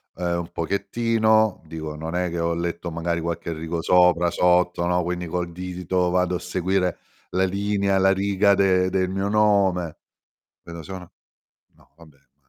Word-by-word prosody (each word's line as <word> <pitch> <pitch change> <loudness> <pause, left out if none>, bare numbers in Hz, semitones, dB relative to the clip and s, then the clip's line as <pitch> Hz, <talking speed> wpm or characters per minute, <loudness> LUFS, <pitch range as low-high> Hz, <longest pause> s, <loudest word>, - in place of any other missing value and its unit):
ehm, 85 -1 -1
un 85 0 -7
pochettino, 110 +4 +1
dico: 80 -1 -6
"Non 80 +2 -5
è 90 0 0
che 85 0 -4
ho 85 0 0
letto, 85 0 -3
magari, 85 +1 -2
qualche 85 0 -3
rigo 80 +1 -4
sopra, 90 0 +4
sotto, 90 0 +2
no." 90 0 +1
Quindi 90 0 -3
col 90 +1 -3
dito 90 0 -2
vado 90 0 +1
a - - -2
seguire 90 0 -1 0.3
la 95 +1 +1
linea, 100 0 0
la 95 0 +4
riga 100 +1 +2
de 95 -1 +3
del 95 -1 0
mio 95 +1 -2
nome, 100 -6 +2 0.7
vedo 85 -1 -9
solo: 90 +1 -9 0.6
"No - - -26
vabbè, 80 -4 -18 0.2
ma 65 - -42
90 Hz, 165 wpm, -23 LUFS, 85-95 Hz, 0.7 s, sopra